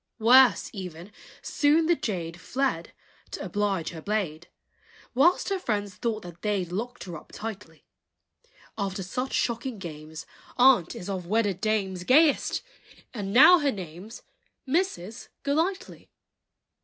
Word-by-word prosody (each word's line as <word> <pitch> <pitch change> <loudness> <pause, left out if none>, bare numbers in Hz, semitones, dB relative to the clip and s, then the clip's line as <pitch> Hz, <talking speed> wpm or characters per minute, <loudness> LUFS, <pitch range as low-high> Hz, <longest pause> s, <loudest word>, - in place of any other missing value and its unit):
Worse, 245 +2 +5
even, 180 -1 -8 0.3
soon 305 +2 +2
the 345 +1 +3
jade 175 - -4
Fled 250 -5 -2 0.4
(to - - -6
oblige 200 -5 -1
her 160 - -9
blade!) 175 -5 -3 0.7
Whilst 310 +11 +3
her 390 -1 -1
friends 205 - -2
thought 220 +1 -3
that 175 -1 -11
they 205 -3 0
'd 175 - -10
Locked 230 +5 -4
her 175 -2 -7
up - - -12
tightly: 205 -7 -8 0.9
After 195 -1 -2
such 250 +8 -4
shocking 235 0 -1
games, 155 -3 -8 0.3
Aunt 245 -9 +5
is 175 - -8
of 185 -3 -4
wedded 205 -2 0
dames 195 -4 -1
Gayest, 290 - +3 0.5
and 200 -5 -4
now 315 - +8
her 290 -2 +1
name's 190 +3 -9 0.4
Mrs. 260 - -2 0.2
Golightly. 325 +7 -2
210 Hz, 130 wpm, -26 LUFS, 180-255 Hz, 0.9 s, now